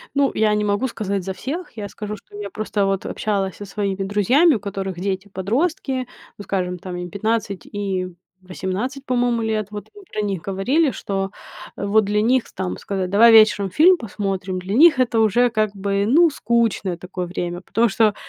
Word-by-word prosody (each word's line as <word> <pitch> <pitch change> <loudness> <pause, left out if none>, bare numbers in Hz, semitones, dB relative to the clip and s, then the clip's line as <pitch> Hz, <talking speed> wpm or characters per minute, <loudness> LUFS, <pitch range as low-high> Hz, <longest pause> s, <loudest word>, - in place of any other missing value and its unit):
Ну, 280 -1 +3
я 215 -1 +3
не 210 - 0
могу 205 +6 +1
сказать 200 -5 -3
за 190 - -4
всех. 320 - -5
Я 205 -1 -4
скажу, 210 +1 -6
что 205 - -17
я 205 -1 -5
просто 210 -1 -1
вот 195 -1 -1
общалась 195 -3 -2
со 205 - -8
своими 195 -1 -2
друзьями, 240 - +4
у - - -2
которых 195 -3 -5
дети 195 +1 -3
подростки, 260 - -1 0.3
ну, 205 - -8
скажем, 180 -3 -2
там 185 -1 -7
им 175 0 -5
15 205 0 -2
и 195 -3 -3 0.3
18, 195 +9 -4
по-моему, 245 -2 +1
лет, 215 -2 -1
вот 210 0 -8
мы 410 - -12
про 215 - -2
них 195 -5 -2
говорили, 250 - +1
что 195 -5 -3 0.5
вот 200 +1 +2
для 210 +1 +1
них 250 +1 +3
там 90 0 -3
сказать: 190 -2 -3
"Давай 230 +3 +7
вечером 215 -3 +6
фильм 340 - +5
посмотрим", 195 -4 -3
для 185 +2 -4
них 305 +3 +6
это 235 -2 +2
уже, 235 +3 +3
как 215 -2 0
бы, 200 0 0
ну, 320 +6 +5
скучное 225 -7 0
такое 180 0 -5
время. 175 0 -4
Потому 225 +5 +1
что 215 0 +2
205 Hz, 185 wpm, -21 LUFS, 195-235 Hz, 0.5 s, Давай